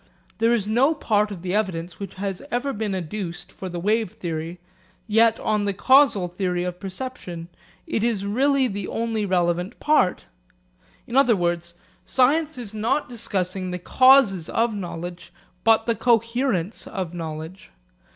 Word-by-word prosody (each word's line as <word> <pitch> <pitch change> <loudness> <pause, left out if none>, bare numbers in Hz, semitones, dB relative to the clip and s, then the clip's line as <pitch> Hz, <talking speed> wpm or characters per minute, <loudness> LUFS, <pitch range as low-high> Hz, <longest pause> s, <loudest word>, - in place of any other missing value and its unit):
This 230 -1 +3
is - - -7
no 260 +8 +3
part 210 -7 +1
of 185 -4 -8
the 180 0 -2
evidence 180 -5 -2
which 200 -3 -7
has 195 -1 -4
ever 270 +3 -1
been 210 -2 -2
adduced 180 0 -5
for 190 - -7
the 175 -1 -5
wave 215 +3 +1
theory, 165 0 -5 0.5
yet 225 +1 +3
on 210 -1 0
the 200 -1 -1
causal 260 -7 +5
theory 180 0 -2
of 180 0 -4
perception, 190 -5 -6 0.4
it 220 - -1
is 220 -4 0
really 270 +6 +2
the 200 -3 -4
only 225 -2 -2
relevant 175 0 0
part. 300 -12 +2 0.8
In 240 - -6
other 265 -4 +5
words, 175 -1 -1 0.3
science 300 +4 +2
is 225 -4 -7
not 235 +8 0
discussing 190 -5 -3
the 180 - -3
causes 240 -4 +4
of 230 0 +1
knowledge, 175 -2 -6 0.3
but 225 0 +4
the 230 - +2
coherence 230 -3 0
of 185 -5 -4
knowledge. 160 +2 -7
205 Hz, 150 wpm, -23 LUFS, 180-230 Hz, 0.8 s, causal